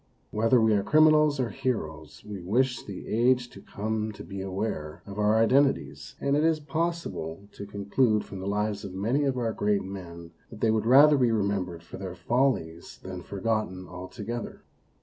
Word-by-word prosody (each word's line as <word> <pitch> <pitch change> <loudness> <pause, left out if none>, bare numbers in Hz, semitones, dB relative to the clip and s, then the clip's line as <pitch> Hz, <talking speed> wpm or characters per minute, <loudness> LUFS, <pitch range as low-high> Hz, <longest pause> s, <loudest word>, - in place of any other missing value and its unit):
Whether 115 +3 +3
we 110 -1 +4
are 100 - +3
criminals 155 +2 +4
or 120 -4 0
heroes, 80 - -4
we 100 -3 -7
wish 125 +7 +1
the 100 -3 -8
age 125 +2 +2
to 100 - -12
come 110 +2 -3
to - - -10
be 100 -1 -7
aware 95 -5 -4
of 100 +1 -8
our 105 +1 +3
identities, 115 - +2
and 140 0 +1
it 150 - +2
is 160 -1 +3
possible 150 - -3
to 100 - -9
con 100 0 -7
clude 110 0 +2
from 95 - -9
the 95 - -5
lives 105 0 -1
of 95 -2 -7
many 120 +9 +1
of 135 -2 0
our 115 -2 -1
great 105 -1 +1
men 85 -3 -8 0.2
that 110 - -11
they 110 - +3
would 110 0 0
rather 145 +3 +7
be 125 -2 +3
remembered 100 -5 -1
for 85 - -10
their 95 -2 -6
follies 90 -5 -1
than 95 -1 -6
forgotten 95 -1 -2
altogether. 100 +6 -7
105 Hz, 185 wpm, -27 LUFS, 95-125 Hz, 0.2 s, rather